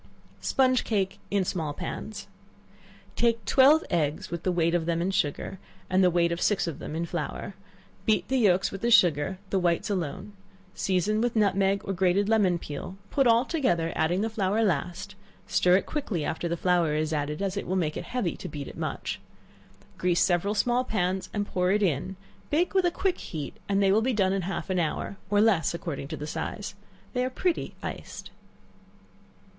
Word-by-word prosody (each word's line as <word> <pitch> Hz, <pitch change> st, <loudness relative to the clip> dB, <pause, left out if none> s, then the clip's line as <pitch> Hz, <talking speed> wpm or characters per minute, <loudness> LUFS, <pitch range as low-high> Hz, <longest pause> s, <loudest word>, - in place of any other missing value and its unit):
Sponge 255 Hz, -1 st, +2 dB
Cake 195 Hz, -4 st, -1 dB
in 200 Hz, -2 st, +1 dB
Small 160 Hz, -5 st, -2 dB
Pans. 205 Hz, +4 st, -6 dB, 0.9 s
Take 230 Hz, -2 st, +1 dB
twelve 280 Hz, +7 st, +6 dB
eggs, 155 Hz, -2 st, -1 dB
with 170 Hz, -1 st, -3 dB
the 185 Hz, -, 0 dB
weight 170 Hz, -1 st, +1 dB
of 170 Hz, -2 st, 0 dB
them 170 Hz, -1 st, +1 dB
in 180 Hz, +3 st, 0 dB
sugar, 190 Hz, 0 st, -1 dB, 0.3 s
and 185 Hz, +1 st, +4 dB
the 180 Hz, -, +6 dB
weight 170 Hz, -1 st, +2 dB
of 170 Hz, -, -2 dB
six 205 Hz, -, +2 dB
of 165 Hz, -5 st, -5 dB
them 155 Hz, -, -6 dB
in 165 Hz, +1 st, -1 dB
flour; 170 Hz, +3 st, -4 dB, 0.5 s
beat 215 Hz, -1 st, +2 dB
the 265 Hz, 0 st, +1 dB
yelks 195 Hz, -4 st, +3 dB
with 195 Hz, -, -7 dB
the 235 Hz, -, +1 dB
sugar, 180 Hz, -5 st, +4 dB
the 195 Hz, -, +2 dB
whites 175 Hz, +2 st, +1 dB
alone; 185 Hz, +2 st, -3 dB, 0.4 s
season 195 Hz, +3 st, 0 dB
with 240 Hz, 0 st, 0 dB
nutmeg 200 Hz, -2 st, +2 dB
or 195 Hz, -, -2 dB
grated 190 Hz, +2 st, +2 dB
lemon 200 Hz, -6 st, +3 dB
peel; 165 Hz, +4 st, -7 dB
put 275 Hz, -3 st, +3 dB
all 235 Hz, +2 st, +5 dB
together, 200 Hz, -, 0 dB
adding 175 Hz, +4 st, +1 dB
the 225 Hz, -, 0 dB
flour 205 Hz, -1 st, 0 dB
the -, -, +3 dB
last; 185 Hz, +3 st, -2 dB, 0.3 s
stir 180 Hz, 0 st, +4 dB
it -, -, -2 dB
quickly 220 Hz, -, -2 dB
after 170 Hz, -, -2 dB
the 170 Hz, 0 st, -2 dB
flour 175 Hz, -4 st, +2 dB
is 155 Hz, +1 st, 0 dB
added, 150 Hz, 0 st, -2 dB
as 195 Hz, -1 st, -1 dB
it 200 Hz, -, -4 dB
will 185 Hz, -, -1 dB
make 160 Hz, -5 st, 0 dB
it -, -, -5 dB
heavy 245 Hz, -9 st, -2 dB
to -, -, -7 dB
beat 145 Hz, -2 st, -6 dB
it -, -, -9 dB
much; -, -, -3 dB, 0.8 s
grease 175 Hz, -1 st, +3 dB
several 190 Hz, +4 st, +1 dB
small 245 Hz, +3 st, +2 dB
pans 190 Hz, -5 st, -1 dB
and 205 Hz, -1 st, -1 dB
pour 180 Hz, -2 st, 0 dB
it 205 Hz, +2 st, +2 dB
in, 175 Hz, +2 st, 0 dB, 0.3 s
bake 335 Hz, +4 st, +1 dB
with 380 Hz, -2 st, +3 dB
a -, -, +5 dB
quick 370 Hz, +1 st, -1 dB
heat, 150 Hz, -4 st, -6 dB, 0.2 s
and 200 Hz, 0 st, +2 dB
they 195 Hz, -, +4 dB
will 215 Hz, +3 st, +4 dB
be 255 Hz, +3 st, +1 dB
done 195 Hz, -3 st, +2 dB
in 195 Hz, -, 0 dB
half 190 Hz, +1 st, -4 dB
an 185 Hz, -, +1 dB
hour, 170 Hz, +4 st, -2 dB
or 205 Hz, 0 st, +3 dB
less, 205 Hz, -6 st, +3 dB
according 155 Hz, -5 st, -5 dB
to 155 Hz, +1 st, -5 dB
the 150 Hz, -, -5 dB
size. 150 Hz, -, -4 dB, 0.4 s
They 250 Hz, -1 st, +1 dB
are 255 Hz, -, 0 dB
pretty 340 Hz, +6 st, -1 dB
iced. -, -, -7 dB
190 Hz, 200 wpm, -27 LUFS, 170-215 Hz, 0.9 s, twelve